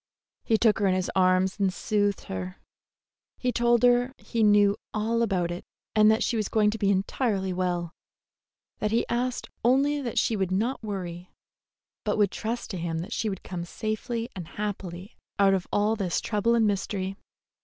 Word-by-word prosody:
He 225 Hz, -, +2 dB
took 220 Hz, -2 st, +3 dB
her 200 Hz, -, +2 dB
in 185 Hz, -, +3 dB
his 185 Hz, -1 st, -1 dB
arms 185 Hz, +1 st, +3 dB
and 195 Hz, -2 st, +2 dB
soothed 205 Hz, 0 st, 0 dB
her. 90 Hz, -1 st, -6 dB, 0.8 s
He 250 Hz, -, 0 dB
told 240 Hz, 0 st, +2 dB
her 245 Hz, +1 st, +4 dB
he 230 Hz, -, -3 dB
knew 205 Hz, -1 st, +5 dB, 0.2 s
all 225 Hz, +2 st, +1 dB
about 185 Hz, -6 st, 0 dB
it, 175 Hz, -, -5 dB, 0.3 s
and 215 Hz, 0 st, +6 dB
that 220 Hz, +2 st, +3 dB
she 240 Hz, -, 0 dB
was 215 Hz, -3 st, -1 dB
going 210 Hz, -2 st, +3 dB
to 220 Hz, -, -5 dB
be 200 Hz, -, +2 dB
entirely 195 Hz, 0 st, 0 dB
well; 175 Hz, -2 st, -1 dB, 0.9 s
that 210 Hz, -, 0 dB
he 230 Hz, +2 st, +1 dB
asked 250 Hz, +1 st, -2 dB
only 280 Hz, +4 st, +3 dB
that 240 Hz, -4 st, -4 dB
she 225 Hz, -, +2 dB
would 190 Hz, -3 st, 0 dB
not 220 Hz, +8 st, 0 dB
worry, 180 Hz, -4 st, -5 dB, 0.7 s
but -, -, 0 dB
would 205 Hz, -2 st, +3 dB
trust 230 Hz, +2 st, -4 dB
to 190 Hz, -, -4 dB
him 165 Hz, -1 st, -2 dB
that 180 Hz, +8 st, -4 dB
she 220 Hz, -, -1 dB
would 190 Hz, -2 st, -6 dB
come 180 Hz, -2 st, -5 dB
safely 225 Hz, +5 st, -3 dB
and 175 Hz, -4 st, -6 dB
happily 195 Hz, -3 st, -5 dB, 0.2 s
out 195 Hz, -1 st, +5 dB
of 190 Hz, -2 st, -1 dB
all 210 Hz, +2 st, +2 dB
this 190 Hz, -5 st, -1 dB
trouble 230 Hz, +2 st, +1 dB
and 225 Hz, -1 st, +3 dB
mystery. 195 Hz, -1 st, -1 dB
205 Hz, 185 wpm, -27 LUFS, 185-230 Hz, 0.9 s, and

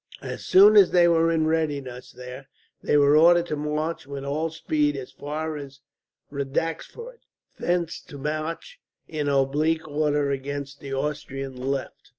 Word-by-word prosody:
As -, -, -6 dB
soon 205 Hz, +3 st, +7 dB
as 195 Hz, -3 st, +8 dB
they 175 Hz, -1 st, +5 dB
were 165 Hz, -1 st, +3 dB
in 160 Hz, -1 st, +1 dB
readiness 145 Hz, -6 st, -2 dB
there, 125 Hz, +2 st, -10 dB, 0.3 s
they 150 Hz, -, +2 dB
were 145 Hz, 0 st, +5 dB
ordered 170 Hz, +2 st, +6 dB
to 155 Hz, -, -3 dB
march 150 Hz, +1 st, -3 dB
with 140 Hz, -1 st, -6 dB
all 155 Hz, +4 st, -1 dB
speed 150 Hz, -2 st, 0 dB
as 130 Hz, -2 st, -7 dB
far 155 Hz, +2 st, -4 dB
as 140 Hz, -1 st, -10 dB, 0.5 s
Radaxford, 165 Hz, -, -4 dB, 0.4 s
thence 175 Hz, -2 st, -1 dB
to 145 Hz, -, -10 dB
march 155 Hz, -, -4 dB, 0.3 s
in 150 Hz, -3 st, -3 dB
oblique 150 Hz, +4 st, +1 dB
order 145 Hz, -1 st, 0 dB
against 140 Hz, +1 st, -5 dB
the 140 Hz, -, -8 dB
Austrian 135 Hz, -1 st, -4 dB
left. 135 Hz, +1 st, -4 dB
150 Hz, 150 wpm, -25 LUFS, 140-165 Hz, 0.5 s, as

